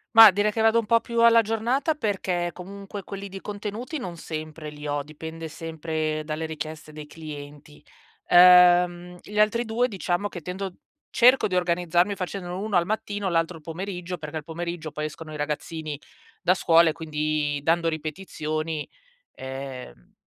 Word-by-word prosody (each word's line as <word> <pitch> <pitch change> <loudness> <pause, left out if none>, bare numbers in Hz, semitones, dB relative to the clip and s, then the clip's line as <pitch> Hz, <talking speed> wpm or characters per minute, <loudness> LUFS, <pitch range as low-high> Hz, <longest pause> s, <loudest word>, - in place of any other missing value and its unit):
Mah 225 -2 +11
direi 205 +2 +1
che 220 - -1
vado 225 +1 +5
un 225 - -4
po' 230 +1 +4
più 235 0 -1
alla 230 0 +7
giornata 235 +8 0
perché, 190 -9 -1
comunque, 195 +3 -8
quelli 200 +1 -7
di 195 0 -8
contenuti 210 +8 -5
non 180 -8 -6
sempre 155 -1 -6
li 150 0 -8
ho, 145 0 -1
dipende 160 +2 -8
sempre 155 -1 -3
dalle 155 +1 -3
richieste 155 0 -7
dei 150 0 -9
clienti. 150 -1 -10 0.4
Ehm, 180 0 +6
gli 210 - -8
altri 215 +3 +3
2 235 +2 +1
diciamo 195 -3 -1
che 180 -4 -8
tendo 185 +3 -5 0.4
cerco 250 +2 +5
di 185 - -2
organizzarmi 175 +2 +2
facendolo 180 -1 -5
1 210 0 -2
al 175 0 +3
mattino 205 -2 -2
l'altro 165 0 0
al - - -15
pomeriggio, 180 +1 -5
perché 155 0 -6
al 155 - -5
pomeriggio 170 0 -5
poi 150 0 -4
escono 155 +1 -7
i 155 - -6
ragazzini 150 0 -4 0.4
da 180 - +3
scuola 170 -2 +5
e - - +1
quindi 155 -2 -1
dando 165 +3 +2
ripetizioni, 155 -1 -3 0.5
ehm, 130 - -8
175 Hz, 165 wpm, -25 LUFS, 155-200 Hz, 0.5 s, Mah